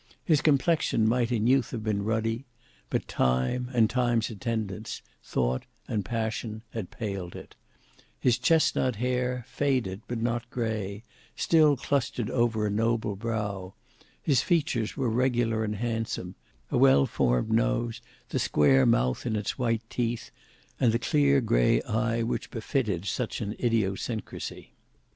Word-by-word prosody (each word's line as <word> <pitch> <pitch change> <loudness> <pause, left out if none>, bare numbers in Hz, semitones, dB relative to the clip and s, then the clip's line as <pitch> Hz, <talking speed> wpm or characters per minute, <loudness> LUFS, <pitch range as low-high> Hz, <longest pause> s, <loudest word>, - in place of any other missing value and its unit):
His 155 -4 +3
complexion 145 -6 +2
might 120 +1 +1
in 110 -3 +1
youth 130 0 +3
have 115 -3 -5
been 105 -2 0
ruddy, 115 +3 -1 0.4
but - - -1
time 65 - 0
and 115 -3 +4
time's 120 -2 +1
attendants, 110 -2 -4 0.2
thought 65 +1 -1 0.2
and 105 -3 -1
passion, 110 +1 -3
had 110 -6 -5
paled 100 -6 -5
it: - - -11 0.6
his 120 - +2
chesnut 130 -3 +3
hair, 125 +1 -1
faded, 125 -9 -1
but 120 -1 -3
not 120 0 -1
grey, 110 -4 -3 0.3
still 155 -4 +4
clustered 120 -4 -1
over 115 -3 +1
a 105 - 0
noble 110 -1 0
brow; 100 -3 -3 0.4
his 135 -5 +2
features 140 -10 0
were 135 -3 0
regular 115 -2 +1
and 105 -1 -2
handsome, 115 -5 -3 0.4
a - - +2
well 130 - +6
formed 60 - +1
nose, 115 +1 +1 0.3
the - - -1
square 70 -3 +4
mouth 65 +1 +2
and 110 -2 0
its 105 +5 -3
white 115 -2 0
teeth, 120 -1 -2 0.5
and 120 - +4
the 115 - +2
clear 140 +1 +3
grey - - +3
eye 115 +1 0
which 115 - -2
befitted 110 - -1
such 120 +3 -2
an 105 -2 -3
idiosyncracy. 110 -1 -2
115 Hz, 140 wpm, -28 LUFS, 105-125 Hz, 0.6 s, well